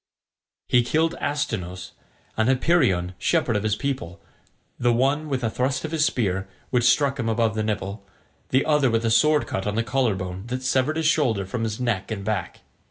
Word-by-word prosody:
He 125 - +4
killed 160 +7 +1
Astynous, 95 -11 -3 0.4
and 110 +2 +2
Hypeiron 125 - +2
shepherd 115 +3 +1
of 105 - +1
his 105 0 0
people, 105 -9 -4 0.6
the 120 0 +3
one 135 +6 +1
with 130 -3 -2
a 115 - +1
thrust 130 +5 -1
of 155 - -5
his 155 -2 +2
spear, 95 -7 -1 0.2
which 120 -2 +2
struck 140 +1 +2
him 115 -2 -1
above 115 -1 +1
the 110 - -1
nipple, 105 -1 -3 0.5
the 130 +1 +2
other 150 -4 +3
with 115 0 0
a 115 - +2
sword 150 +6 +4
cut 95 +1 -3
on 105 - -1
the 115 - +1
collar 120 -2 +1
bone, 95 +1 -6
that 125 +1 -4
severed 130 +4 +1
his 160 - -1
shoulder 125 - +2
from 110 +5 -4
his 110 0 -3
neck 115 -6 -1
and 100 -3 -4
back. - - -3
120 Hz, 195 wpm, -24 LUFS, 105-135 Hz, 0.6 s, He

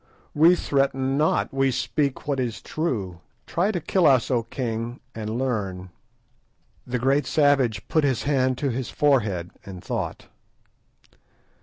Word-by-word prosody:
"We 165 +4 +6
threaten 135 -3 0
not, 150 0 +1
we 135 0 +2
speak 140 +3 -1
what 140 -2 0
is 120 -4 -2
true. 105 - -3 0.3
Try 180 +5 0
to 180 - -2
kill 175 +2 +2
us, 130 -4 +3
O 120 -2 +2
king, 115 0 -4
and 110 +1 -4
learn." 100 -8 -3 1.0
The 125 0 -1
great 135 +4 +1
savage 140 -7 +2
put 155 - +2
his 135 -4 +1
hand 130 -3 +1
to 140 -1 -1
his 125 +1 -3
forehead 105 -12 +1
and 95 -2 -9
thought. - - -4
130 Hz, 140 wpm, -24 LUFS, 115-145 Hz, 1.0 s, We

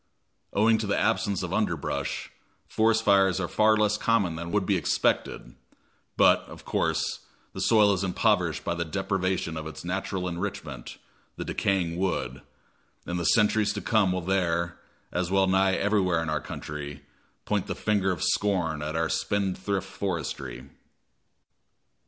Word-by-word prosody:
Owing 110 +2 +3
to 110 - -2
the 100 - +1
absence 105 -3 +1
of - - -4
underbrush, - - -2 0.4
forest 110 0 +2
fires 95 -3 +4
are 90 - -1
far 110 +3 +3
less 105 0 +2
common 100 -8 +1
than 85 +1 -5
would 105 -2 +1
be 100 - +2
expected; 70 -6 0 0.6
but, - - +6
of - - -12
course, - - 0 0.3
the - - -5
soil 105 -2 +5
is 95 0 -1
impoverished 90 -4 +1
by - - 0
the 85 0 -2
deprivation 95 0 -1
of 80 0 -5
its 80 - -9
natural 95 0 -2
enrichment, 85 -8 -5 0.4
the - - -5
decaying 90 -4 0
wood, 95 0 -2 0.6
and 90 0 -3
the 85 - -2
centuries 105 0 +3
to 105 - -4
come 105 -4 +2
will 90 0 -1
there, 85 -2 0 0.3
as 90 0 -1
well 95 0 +3
nigh 95 0 +3
everywhere 95 -5 +1
in 80 - -3
our 75 -1 -1
country, 75 -1 -7 0.4
point - - -1
the - - -3
finger 100 -3 +1
of 90 -4 -2
scorn 90 -7 +1
at 75 +1 -4
our 80 0 +1
spendthrift 100 +1 -1
forestry. 85 -9 -4
95 Hz, 150 wpm, -27 LUFS, 85-100 Hz, 0.6 s, but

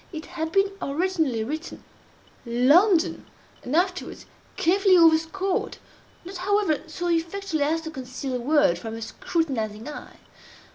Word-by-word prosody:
It 315 -3 -7
had 320 -2 -4
been 390 +2 +2
originally 305 -6 0
written 310 +8 -6 0.6
London, 300 - +3 0.3
and 255 - -3
afterwards 365 +2 -1 0.3
carefully 380 +2 +4
overscored—not, 345 +2 0
however, 385 -4 +1
so 350 +3 -4
effectually 335 0 -1
as 325 +2 0
to 320 0 -7
conceal 260 -1 -6
the 250 - -1
word 275 - +2
from 225 +4 -6
a 225 - -7
scrutinizing 225 -7 -3
eye. 300 - -9
320 Hz, 125 wpm, -25 LUFS, 270-365 Hz, 0.6 s, carefully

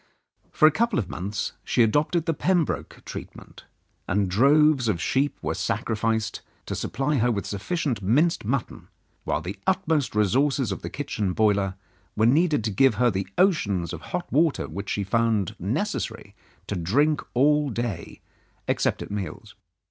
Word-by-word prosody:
For 155 - +5
a - - +5
couple 230 +5 +1
of 95 -6 -2
months 95 +3 -3
she 120 - +3
adopted 150 +8 +1
the 165 - +1
Pembroke 175 0 -1
treatment, - - -10 0.4
and 100 0 0
droves 140 +4 +4
of 100 -6 0
sheep 135 +10 0
were - - -1
sacrificed 110 -1 -1 0.2
to - - -4
supply 140 +4 -1
her 120 0 +2
with 100 -3 -2
sufficient 125 - -2
minced 150 - +2
mutton, 120 +3 -3 0.4
while 75 - 0
the 95 +5 -6
utmost 160 - +1
resources 130 +4 +2
of 95 - -4
the - - -5
kitchen 105 -9 -3
boiler 100 -3 +2 0.4
were 110 - +3
needed 150 +1 +3
to 110 - -1
give 125 +4 +4
her 120 +2 +3
the 95 -1 -3
oceans 105 - +2
of - - -6
hot - - -4
water 155 +1 +2
which 100 +5 -6
she 100 - -1
found 110 -2 +1
it - - -21
necessary 110 - -3 0.3
to 105 - -3
drink 140 - +2
all 150 +3 +3
day 115 -7 -4 0.5
except - - 0
at - - -10
meals. 100 -2 -6
115 Hz, 160 wpm, -25 LUFS, 100-150 Hz, 0.5 s, For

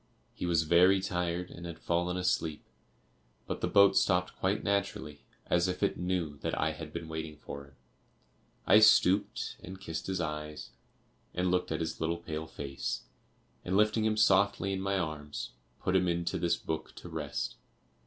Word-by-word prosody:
He 90 - -4
was 85 -2 +3
very 90 +4 +5
tired 90 -1 -2
and 85 +1 -8
had 85 - -7
fallen 90 +1 0
asleep, 80 -4 0 0.8
but - - -4
the - - +1
boat 100 -1 +6
stopped 90 0 +2
quite 95 +2 0
naturally, 100 -7 -1 0.2
as 90 +1 +2
if 90 +2 -2
it 100 - +2
knew 90 -5 -2
that - - -3
I 80 +1 +2
had 80 0 -8
been 80 - -5
waiting 80 -1 -5
for 70 -1 -8
him. 70 - -20 0.9
I 105 - +7
stooped, 105 +2 +4
and 95 +1 -8
kissed 80 -4 -5
his 95 -1 -1
eyes, 75 -2 -4 0.6
and 90 0 +1
looked 90 -2 0
at 80 - -1
his 80 - -3
little 85 +1 0
pale 80 -2 -5
face, 70 -3 -4 0.6
and 95 +2 0
lifting 105 +1 +3
him 110 0 +1
softly 100 -1 +3
in 95 - -2
my 100 0 0
arms, 75 -4 -4 0.3
put 95 - +1
him 90 -1 +3
into 85 0 0
this 85 0 +1
book 80 -1 -5
to - - -10
rest. 75 -4 -4
85 Hz, 175 wpm, -31 LUFS, 80-95 Hz, 0.9 s, I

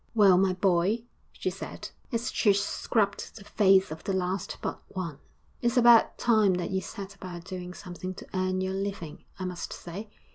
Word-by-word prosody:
'Well, 200 -4 +7
my 190 -1 +3
boy,' 190 +4 +2 0.3
she - - -3
said, - - -7 0.2
as 230 -1 -1
she 205 -3 +4
scrubbed 200 +1 0
the 215 - -10
face 195 -3 +4
of 160 - -7
the 195 - -1
last 190 +1 -2
but - - -4
one, 170 -7 -5 0.4
'it's 240 +1 +1
about 235 -2 +6
time 215 -5 +4
that 180 +1 -3
you 190 0 0
set 195 +2 -7
about 180 -3 -8
doing 180 -1 -6
something 185 0 -7
to - - -10
earn 185 0 0
your 190 0 -1
living, 195 -5 -4
I 185 - -4
must 180 -2 -5
say. 195 +5 -7
190 Hz, 180 wpm, -28 LUFS, 180-205 Hz, 0.4 s, Well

